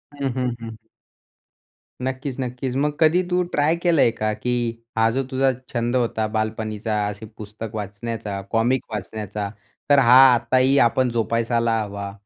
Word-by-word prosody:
हं, 140 -1 -2
हं, 125 -2 -1
हं. 115 -1 -7 1.3
नक्कीच, 130 +1 -3
नक्कीच. 125 0 -3
मग 145 +2 0
कधी 165 +3 +4
तू 180 0 +2
ट्राय 150 +3 +2
केलंय 170 -8 +3
का, 110 -1 -2
की 120 +1 -2 0.2
हा 110 0 +4
जो 135 +3 -1
तुझा 135 0 +2 0.2
छंद 120 0 -1
होता 115 -3 0
बालपणीचा. 110 -1 -2
असे 105 +1 -6
पुस्तक 110 +1 -8
वाचण्याचा, 105 0 -5
कॉमिक 120 +3 +2
वाचण्याचा. 105 0 -4 0.4
तर 145 -1 +6
हा 125 -1 +7 0.2
आताही 130 +3 +2
आपण 125 +2 +3
जोपासायला 115 0 0
हवा 100 -1 -5
115 Hz, 140 wpm, -22 LUFS, 110-130 Hz, 1.3 s, हा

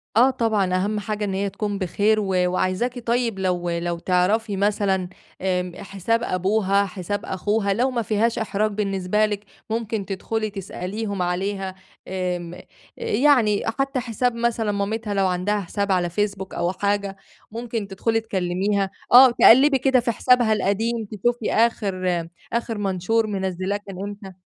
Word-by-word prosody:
آه، 245 +4 +6
طبعًا 220 -7 +1
أهم 205 +3 0
حاجة 210 0 -3
إن 195 - -2
هي 200 +1 -1
تكون 205 0 -3
بخير، 205 +4 +2
و 210 - -1 0.2
وعايزاكي 185 +7 -1
طيّب 235 -3 0
لو 180 -2 -1
لو 170 0 -2
تعرَفي 195 +4 +1
مثلًا، 195 -2 +1 0.3
آمم 180 -1 -1
حساب 200 +4 -2
أبوها، 200 +1 +1
حساب 195 +1 -4
أخوها، 200 +1 0
لو 250 +6 +1
ما 240 -2 -1
فيهاش 220 +2 0
إحراج 215 0 0
بالنسبة 200 0 0
لِك، 205 -1 -4 0.2
ممكن 220 -2 -2
تدخُلي 215 +3 -3
تسأليهم 200 +1 -5
عليها، 190 +2 -2 0.3
آمم 180 -2 -3 0.4
يعني، 235 -4 +3 0.2
حتّى 275 -1 0
حساب 245 0 -1
مثلًا 230 -2 0
مامتها 205 +2 -2
لو 195 -1 +2
عَندها 185 +3 0
حساب 200 +2 -2
على 180 -2 +1
فيسبوك 195 +1 -2
أو 175 - 0
حاجة، 200 0 -1 0.3
ممكن 230 -2 -4
تدخُلي 225 +4 0
تكلّميها، 195 0 -1 0.2
آه 255 +1 +9
تقلِّبي 270 +4 +6
كده 265 0 +3
في 235 0 0
حسابها 240 0 +3
القديم 220 +3 0
تشوفي 220 +3 -1
آخر 185 -7 +1 0.3
آخر 235 -1 -1
منشور 205 +3 0
منزّلاه 190 -1 -2
كان 190 -2 -8
إمتى. 200 -2 -8
205 Hz, 145 wpm, -23 LUFS, 190-225 Hz, 0.4 s, آه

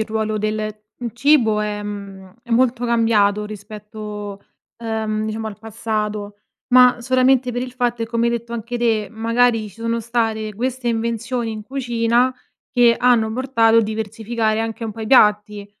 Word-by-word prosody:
il 220 - +1
ruolo 220 -1 -2
del, 215 0 -3 0.2
mhmm, 240 -1 -3
cibo 240 -5 +3
è 210 0 -3
mhmm 195 -2 -8
è 240 - -16
molto 245 +1 +2
cambiato 210 -3 +2
rispetto, 210 -1 -8 0.4
ehm, 220 -2 -2
diciamo 220 0 -4
al 215 -1 -7
passato, 215 -2 -4 0.4
ma 250 -1 +6
solamente 255 0 +2
per 245 +1 -2
il 255 -1 -6
fatto 240 -2 -1
e 225 - -2
come 230 0 0
hai 235 - +1
detto 235 0 -4
anche 235 +1 -4
te, 225 -3 +1
magari 230 0 +1
ci - - -20
sono 230 0 -1
state 225 -2 -1
queste 245 +3 -3
invenzioni 230 +1 -2
in 215 -1 -6
cucina 240 0 0 0.4
che 240 -2 +5
hanno 235 -3 +3
portato 230 -3 +3
a - - +5
diversificare 220 +1 -2
anche 225 0 -4
un 220 - -4
po' 225 - -10
i 220 - -4
piatti, 210 -4 +3
225 Hz, 165 wpm, -20 LUFS, 215-240 Hz, 0.4 s, ma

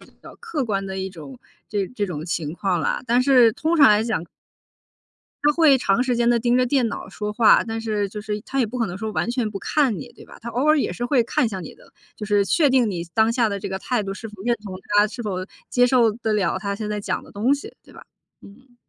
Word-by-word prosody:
比 - - -16 0.2
较 - - -12
客 335 - -3
观 200 -4 -2
的 190 - -5
一 190 0 -4
种 145 -7 -11 0.3
这 200 -2 -1
这 210 -5 -3
种 160 -4 -5
情 160 -3 -3
况 180 0 -1
啦， - - -1
但 245 +2 +3
是 250 -4 +5
通 320 +8 0
常 285 -4 +8
来 210 0 +4
讲 220 -7 -2 1.2
他 295 +1 +4
会 300 -4 +5
长 240 -1 +1
时 255 -1 0
间 235 0 +2
地 240 - +4
盯 240 +1 +2
着 255 - +3
电 250 -2 +1
脑 - - -6
说 210 +2 -5
话， 215 +1 +5
但 225 -1 -4
是 210 -3 -2
就 210 - -7
是 210 0 -4
他 270 +5 -4
也 250 - +3
不 245 +4 -6
可 230 - +1
能 185 -1 -6
说 220 0 -4
完 - - -1
全 240 -4 -1
不 200 - -6
看 265 - +1
你， 145 - -8
对 - - -15
吧， - - -14
他 235 - -6
偶 255 +5 -1
尔 310 +1 +5
也 280 - 0
是 240 - -4
会 245 -2 +2
看 235 - 0
一 - - +1
下 195 -3 -5
你 160 - -9
的， - - -21 0.2
就 210 - -6
是 205 -1 +2
确 290 - +3
定 255 -4 +3
你 170 -2 -4
当 220 0 +3
下 230 -1 +2
的 200 - -3
这 200 0 -5
个 190 0 -4
态 240 +1 -1
度 195 0 -4
是 225 +3 -8
否 210 -3 -12
认 240 +1 +1
同 190 -3 -7 0.2
他， 210 - +5
是 240 +2 -7
否 185 -3 -3 0.2
接 245 0 +3
受 240 -3 +4
得 220 0 -2
了 190 -4 +1
他 200 0 -3
现 210 +1 -5
在 210 0 -2
讲 - - -3
的 - - -16
东 225 +7 +1
西， 285 - -10
对 - - -18
吧？ - - -13 0.4
嗯。 245 +5 -17
220 Hz, 290 characters per minute, -22 LUFS, 200-245 Hz, 1.2 s, 常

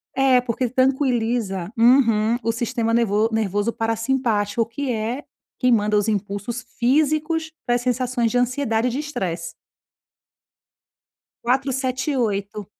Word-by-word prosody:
É 265 -2 +4
porque 245 0 -2
tranquiliza 240 -7 0
uhum, 230 -2 +4
o 230 - +1
sistema 230 -1 -1
nervo 225 -1 +2
nervoso 210 0 0
parassimpático 225 -1 0
que 250 +4 -4
é 230 +5 -3 0.4
quem 250 -1 +3
manda 210 -2 +3
os 205 - +1
impulsos 210 +3 -3
físicos 310 +5 +1
para 240 -1 +2
sensações 245 -1 0
de - - +1
ansiedade 245 -2 +1
e 250 - -1
de 270 - -3
estresse. 175 - -4 1.9
4, 265 +3 +1
7, 260 +2 -1
8. 205 -3 -2
235 Hz, 120 wpm, -22 LUFS, 215-260 Hz, 1.9 s, É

